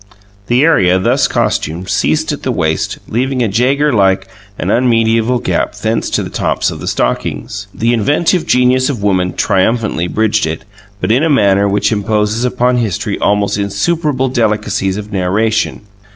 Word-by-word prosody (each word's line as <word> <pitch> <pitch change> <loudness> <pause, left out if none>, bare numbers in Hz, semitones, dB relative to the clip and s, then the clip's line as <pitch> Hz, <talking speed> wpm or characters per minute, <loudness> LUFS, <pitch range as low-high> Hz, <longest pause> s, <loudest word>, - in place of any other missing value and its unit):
The 125 +3 +3
area 95 - +4
thus 125 +7 +2
costumed 85 -3 -2
ceased 155 +7 0
at 145 - -5
the 130 - -2
waist, 80 -8 -1
leaving 130 +2 -1
a - - +1
Jaeger 135 +8 +1
like 95 -2 +2 0.3
and 90 - -2
unmedieval 115 0 +2
gap 120 - -2
thence 110 +2 -2
to - - -1
the - - -7
tops - - -1
of - - -8
the - - -7
stockings. 105 -1 -2
The 115 +4 0
inventive 150 - +1
genius 125 +1 +3
of 120 -8 -4
woman 90 -3 +1
triumphantly 100 -3 0
bridged 110 -1 0
it, 80 +1 -5 0.3
but - - -1
in 125 +5 +3
a 165 - +1
manner 100 -7 +3
which 100 +3 +1
imposes 105 +2 0
upon 125 0 +1
history 110 -7 -2
almost 100 0 +1
insuperable 130 - -1
delicacies 105 -5 0
of 105 0 -7
narration. 100 +4 0
110 Hz, 160 wpm, -14 LUFS, 100-125 Hz, 0.3 s, area